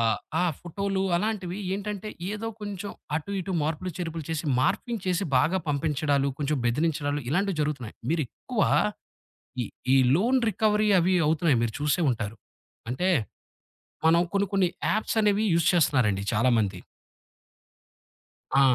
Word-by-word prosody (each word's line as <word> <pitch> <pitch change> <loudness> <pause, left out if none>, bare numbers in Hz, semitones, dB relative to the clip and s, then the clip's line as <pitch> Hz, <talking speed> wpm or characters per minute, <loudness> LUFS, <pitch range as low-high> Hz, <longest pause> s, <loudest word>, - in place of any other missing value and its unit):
ఆ! - - +2 0.4
ఆ - - +2 0.2
ఫోటోలు 195 +2 -2
అలాంటివి 195 -2 -2 0.2
ఏంటంటే 205 +1 -4 0.2
ఏదో 220 +2 -4
కొంచం 205 -1 -5 0.2
అటు 160 +5 -5
ఇటు 190 +1 -4
మార్పులు, 160 +4 -2
చేర్పులు 165 -3 -4
చేసి 160 0 -2 0.2
మార్ఫింగ్ 230 - 0
చేసి 185 +2 +1
బాగా 175 +9 +2
పంపించడాలు 145 -1 +1
కొంచం 145 0 0
బెదిరించడాలు, 145 +2 0
ఇలాంటివి 195 +1 0
జరుగుతున్నాయి. 135 -7 -3 0.2
మీరెక్కువ 155 -6 -1 1.0
ఈ - - -2 0.3
ఈ - - +6 0.2
లోన్ 235 - +3
రికవరీ 215 +1 +2
అవి 180 +2 +2
అవుతున్నాయి. 155 -3 +3
మీరు 115 - 0
చూసే 150 +4 +1
ఉంటారు. 115 -2 -3 0.5
అంటే 130 +10 0 1.0
మనం 170 +1 +5
కొన్ని 200 0 +2
కొన్ని 195 -3 +3 0.2
యాప్స్ 215 +1 -1
అనేవి 210 +1 +3
యూజ్ 170 -1 +2
చేస్తన్నారండి 125 - +2
చాలా 120 +5 +3
మంది. 100 -4 0 1.8
ఆ! - - +6
170 Hz, 130 wpm, -26 LUFS, 145-200 Hz, 1.8 s, ఈ